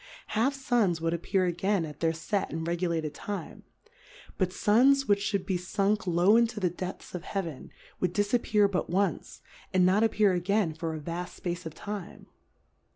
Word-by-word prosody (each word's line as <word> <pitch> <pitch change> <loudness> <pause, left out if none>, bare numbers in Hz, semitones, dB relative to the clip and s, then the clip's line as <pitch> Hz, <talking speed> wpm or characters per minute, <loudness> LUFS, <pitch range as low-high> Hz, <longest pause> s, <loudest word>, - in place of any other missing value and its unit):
Half 245 +6 +1
Suns 240 -10 +1
would 165 +1 0
appear 185 +3 0
again 180 +1 0
at 150 -1 -10
their 165 -1 +2
fet 190 +5 -2
and 160 +1 -4
regulated 170 -3 -1
Time. 200 +6 -6 0.8
But 185 -2 +1
Suns, 265 +8 +4
which 200 +1 +2
fl^ould 200 -3 -1
be 185 - 0
funk 200 +3 0
low 175 +4 +4
into 235 -2 +1
the 180 -4 +1
depths 180 +1 -7
of 180 -2 -5
Heaven, 175 -9 -4 0.3
would 180 - 0
difappear 205 +1 +2
but 185 -4 -2
once, 195 +3 -1 0.3
and 185 -1 +4
not 190 +3 +4
appear 210 -3 +3
again 180 0 +1
for 160 0 -4
a - - -5
vaft 170 +3 -6
fpace 175 -1 -3
of 160 - -9
Time. 205 -3 -7
185 Hz, 170 wpm, -28 LUFS, 170-210 Hz, 0.8 s, Suns